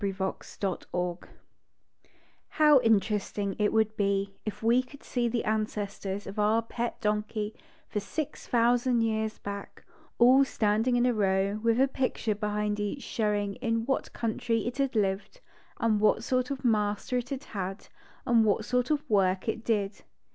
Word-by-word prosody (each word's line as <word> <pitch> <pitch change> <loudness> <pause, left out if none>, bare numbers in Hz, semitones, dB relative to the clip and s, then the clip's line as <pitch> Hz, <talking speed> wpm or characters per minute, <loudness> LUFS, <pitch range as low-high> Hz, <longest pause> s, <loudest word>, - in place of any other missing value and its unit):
38 195 -2 -2
THE 190 0 -4
DONKEY 180 -2 -3 1.3
JJOW 300 -3 +7
interesting 205 -2 +1
it 210 0 +2
would 220 -1 +2
be 200 -1 0
if 215 - -5
we 235 +3 +4
could 265 +2 -15
see 245 -2 -1
the 235 0 -1
ancestors 205 -2 -2
of 195 +2 -6
our 215 +2 +3
pet 235 +1 -4
donkey 210 0 -1 0.3
for 210 - -2
six 280 +9 -5
thousand 240 0 +3
years 220 -1 -1
back, 200 0 -8 0.3
all 255 +3 +7
Standing 225 0 +1
in 245 0 +3
a 250 - +3
row, 200 -1 +1
with 230 +1 +2
a 270 - +5
picture 255 -4 -1
behind 210 0 -2
each 205 +7 -3
showing 205 -2 -1
in 230 -2 -1
what 270 +1 -1
country 230 0 -1
it 240 +2 -3
had 275 -3 0
lived, 200 - -1 0.4
and 220 -2 +2
what 215 +1 +3
sort 255 0 0
of 270 -2 -4
master 210 +2 +1
it 245 +1 -7
had 275 0 -4
had, 195 0 -5 0.4
and 235 -3 +4
what 210 -2 +1
sort 250 +1 0
of 300 0 0
work 190 -3 +2
it 220 0 -2
did. 205 -3 -1
220 Hz, 160 wpm, -28 LUFS, 205-245 Hz, 1.3 s, JJOW